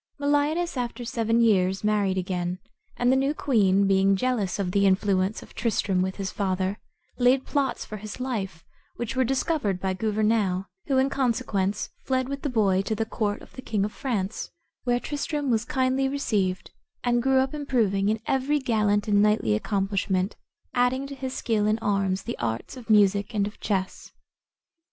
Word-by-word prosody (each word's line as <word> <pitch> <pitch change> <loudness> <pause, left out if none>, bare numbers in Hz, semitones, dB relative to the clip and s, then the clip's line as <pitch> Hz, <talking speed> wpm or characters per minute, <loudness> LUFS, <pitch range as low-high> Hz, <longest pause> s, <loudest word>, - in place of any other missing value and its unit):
Meliadus 290 +3 +1
after 240 0 -3
seven 230 -1 +1
years 195 -4 +3
married 205 -3 +1
again, 180 -1 -2 0.4
and 245 +1 +3
the - - +4
new 275 +3 +1
queen, 200 -9 +3
being 195 0 +4
jealous 215 -3 0
of 190 -3 -1
the 200 +1 +3
influence 190 +1 +1
of - - -16
Tristram 205 -5 0
with 190 0 -1
his 195 -2 -4
father, 190 0 -1 0.4
laid 255 +2 +4
plots 280 -3 -1
for 215 - -7
his 210 +3 -8
life, 200 -10 -4 0.3
which 240 +2 -4
were 260 - +3
discovered 260 - 0
by 190 0 -1
Gouvernail, 210 -2 +1 0.2
who 270 - +2
in 265 +1 +2
consequence 230 -7 0
fled 260 -1 0
with 280 0 -4
the 290 - -1
boy 200 -6 +2
to 215 +2 -2
the 225 - -1
court 210 -2 -2
of - - -16
the 260 - -8
king 210 -5 -1
of 210 - -4
France, 220 -7 -3 0.4
where 245 -1 +2
Tristram 290 0 -2
was 225 0 +1
kindly 260 +1 +1
received, 205 -9 -1 0.3
and 240 -1 +2
grew 265 +1 +3
up 265 +1 +2
improving 225 -9 +1
in 220 +1 0
every 270 +3 +1
gallant 215 -6 +1
and 205 -1 +4
knightly 210 - +3
accomplishment, 195 - 0 0.4
adding 250 +2 +1
to 275 - -7
his 265 -1 -5
skill 215 -3 0
in 215 +1 +2
arms 195 -3 0
the 235 - -5
arts 115 - -3
of 245 -3 -11
music 205 0 +3
and 200 -1 +2
of 205 - -8
chess. 190 -3 -3
215 Hz, 175 wpm, -26 LUFS, 195-255 Hz, 0.4 s, the